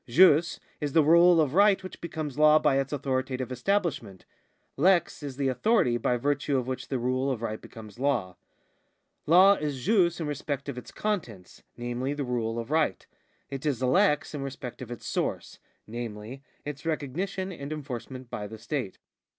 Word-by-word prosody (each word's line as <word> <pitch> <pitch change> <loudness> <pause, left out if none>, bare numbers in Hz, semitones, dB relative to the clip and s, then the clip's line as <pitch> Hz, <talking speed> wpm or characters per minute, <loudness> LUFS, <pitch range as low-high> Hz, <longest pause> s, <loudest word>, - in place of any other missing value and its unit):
Jus 170 +4 +5 0.2
is 145 -3 -3
the 160 - +5
rule 170 +2 +6
of 150 -4 +2
right 200 +1 +4
which 185 - -9
becomes 155 -5 -5
law 155 0 +7
by 135 -3 +3
its 135 -1 -2
authoritative 130 -2 -2
establishment; 125 - -1 0.5
lex 175 +2 +2
is 140 -3 -6
the 140 -1 0
authority 130 - +2
by 125 +1 0
virtue 145 +2 0
of 125 - -1
which 130 0 -4
the 135 - -1
rule 130 +2 0
of 120 -4 -3
right 110 -1 -3
becomes 110 -1 -12
law. 120 -10 0 0.9
Law 185 +5 +7
is 145 -4 -4
jus 180 -5 +3
in 165 - -2
respect 145 -1 -4
of 140 - -4
its 125 - -9
contents, 125 - -4 0.2
namely 120 +3 -3
the 145 -2 -3
rule 115 -2 -2
of 115 +4 -5
right; 160 -1 +1 0.5
it 135 -1 -5
is 135 -5 -1
lex 155 +4 +2
in 145 - -4
respect 135 -2 -7
of 125 - -7
its 120 -2 -8
source, - - -3 0.3
namely, 115 +2 -7 0.2
its 145 -1 -6
recognition 175 +5 -3
and 145 -4 -7
enforcement 130 -3 -6
by 105 -3 -5
the 110 +2 -9
state. 125 -4 -4
140 Hz, 175 wpm, -28 LUFS, 125-160 Hz, 0.9 s, law